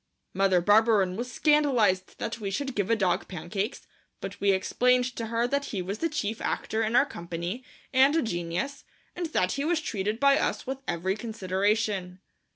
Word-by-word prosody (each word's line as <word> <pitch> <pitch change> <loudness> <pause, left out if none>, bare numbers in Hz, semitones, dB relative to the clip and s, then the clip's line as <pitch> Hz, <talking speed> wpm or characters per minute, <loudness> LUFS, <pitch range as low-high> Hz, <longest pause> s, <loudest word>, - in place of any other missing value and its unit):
Mother 190 -2 +3
Barberin 205 -1 +4
was 245 +4 -4
scandalized 250 -12 +2
that 230 - -4
we 200 -2 -3
should 270 +7 -3
give 205 -3 -1
a 230 - +4
dog 185 -5 0
pancakes, 195 - -4 0.3
but - - -7
we 200 - +3
explained 250 +6 +2
to 230 - -4
her 230 +1 0
that 280 +2 -1
he 195 -8 -3
was 195 +4 -4
the 330 - 0
chief 225 -8 -3
actor 220 - -1
in 225 +1 0
our 250 - +6
company 175 - -5 0.3
and 270 +3 +5
a 325 - +2
genius, 175 +8 -3 0.3
and 350 -1 -2
that 185 - +1
he 280 - -2
was 330 +1 +1
treated 210 -6 -2
by 280 +1 +5
us - - -1
with 265 0 -4
every 185 +3 -1
consideration. 200 -3 -1
220 Hz, 180 wpm, -27 LUFS, 190-255 Hz, 0.3 s, our